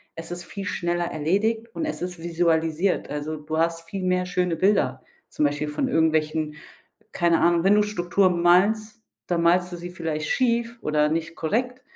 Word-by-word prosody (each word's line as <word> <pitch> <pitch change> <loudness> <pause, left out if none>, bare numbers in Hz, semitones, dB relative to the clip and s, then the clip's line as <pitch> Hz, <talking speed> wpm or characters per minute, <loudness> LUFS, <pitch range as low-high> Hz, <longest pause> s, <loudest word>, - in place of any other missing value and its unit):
Es 165 +1 -7
ist 175 0 -5
viel 195 +3 -7
schneller 175 -1 -1
erledigt, 205 +9 0
und 320 - -2
es 310 - -4
ist 180 0 -4
visualisiert. 165 +1 0
Also, 150 +1 -4
du 155 +1 -4
hast 165 0 -1
viel 195 +2 -4
mehr 180 0 +1
schöne 180 -1 0
Bilder, 160 -9 +1 0.3
zum 150 - 0
Beispiel 145 +1 -1
von 260 - -1
irgendwelchen 155 -4 +1 0.6
keine 170 -2 +2
Ahnung 170 0 +3
wenn 195 +2 +5
du 210 - +4
Struktur 190 -2 +1
malst, 205 +6 +2 0.2
dann 175 -1 0
malst 180 +1 +3
du 175 - -4
sie 175 +1 -7
vielleicht 160 -4 -3
schief 235 -1 0
oder 150 0 +2
nicht 165 +1 -2
korrekt. 250 +9 -2
175 Hz, 175 wpm, -24 LUFS, 160-195 Hz, 0.6 s, wenn